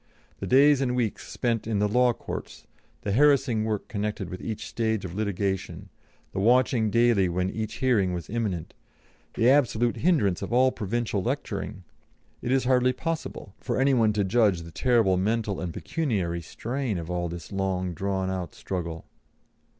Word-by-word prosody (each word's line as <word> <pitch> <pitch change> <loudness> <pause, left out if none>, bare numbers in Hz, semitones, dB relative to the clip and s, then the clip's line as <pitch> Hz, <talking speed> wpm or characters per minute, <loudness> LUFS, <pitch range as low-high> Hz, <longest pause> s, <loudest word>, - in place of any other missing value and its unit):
The - - -4
days 140 +2 +5
and 125 -2 0
weeks 120 -4 -2
spent 115 -3 -1
in 110 -2 0
the 105 +1 +2
Law 125 +3 +4
Courts, - - -7 0.4
the 100 - -1
harassing 130 -3 +3
work 110 -2 -2
connected 105 -4 -3
with 90 - -6
each 110 -2 -4
stage 110 -3 -1
of 85 - -6
litigation, 95 -2 -2 0.4
the - - -3
watching 120 +1 +3
daily 115 -4 +3
when 90 +2 -1
each 110 -1 -4
hearing 110 -8 +2
was 85 -2 -4
imminent, 105 -8 -3 0.6
the 115 - +3
absolute 120 -4 +3
hindrance 140 - +2
of - - -5
all 130 +2 +4
provincial 110 -1 -2
lecturing 110 -5 -3 0.6
it 120 - -2
is 135 0 +3
hardly 125 0 +3
possible 160 - -5
for - - -2
any 135 +1 +4
one 115 -4 +4
to 105 -1 +1
judge 100 -4 +2
the 85 - -10
terrible 115 -4 +3
mental 105 +1 0
and 90 -2 -3
pecuniary 95 - -2
strain 120 - -3
of 85 0 -5
all 85 -1 -1
this 85 -1 -8
long 95 -2 -1
drawn 95 +2 -2
out 90 -4 -4
struggle." 85 -3 -5
110 Hz, 165 wpm, -26 LUFS, 95-125 Hz, 0.6 s, days